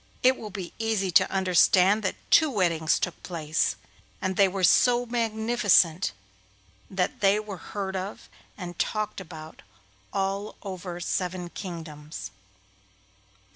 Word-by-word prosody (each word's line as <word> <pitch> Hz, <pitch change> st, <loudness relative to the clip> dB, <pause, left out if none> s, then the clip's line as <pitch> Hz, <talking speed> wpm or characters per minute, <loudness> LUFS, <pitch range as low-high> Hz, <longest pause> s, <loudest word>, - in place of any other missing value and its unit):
It 255 Hz, +1 st, +6 dB
will 215 Hz, -, -8 dB
be 190 Hz, -3 st, -7 dB
easy 220 Hz, -4 st, 0 dB
to -, -, +5 dB
understand 190 Hz, +2 st, +4 dB
that 190 Hz, -, -1 dB, 0.2 s
two 315 Hz, -2 st, +6 dB
weddings 170 Hz, -, +1 dB
took 180 Hz, -, -3 dB
place, 160 Hz, -3 st, -1 dB, 0.4 s
and 190 Hz, -1 st, -2 dB
they 200 Hz, 0 st, +5 dB
were 190 Hz, 0 st, -3 dB
so 245 Hz, +6 st, +5 dB
magnificent 220 Hz, -6 st, +2 dB, 0.8 s
that 185 Hz, -1 st, -1 dB
they 200 Hz, +1 st, +4 dB
were 210 Hz, -3 st, -6 dB, 0.2 s
heard 190 Hz, -1 st, -2 dB
of 115 Hz, -, -5 dB, 0.3 s
and 175 Hz, -1 st, -7 dB
talked 215 Hz, -2 st, -1 dB
about 160 Hz, -3 st, -10 dB, 0.5 s
all 195 Hz, +1 st, -2 dB
over 185 Hz, -3 st, -6 dB
seven 180 Hz, 0 st, -2 dB
kingdoms. 155 Hz, -, -7 dB
190 Hz, 125 wpm, -26 LUFS, 175-210 Hz, 0.8 s, It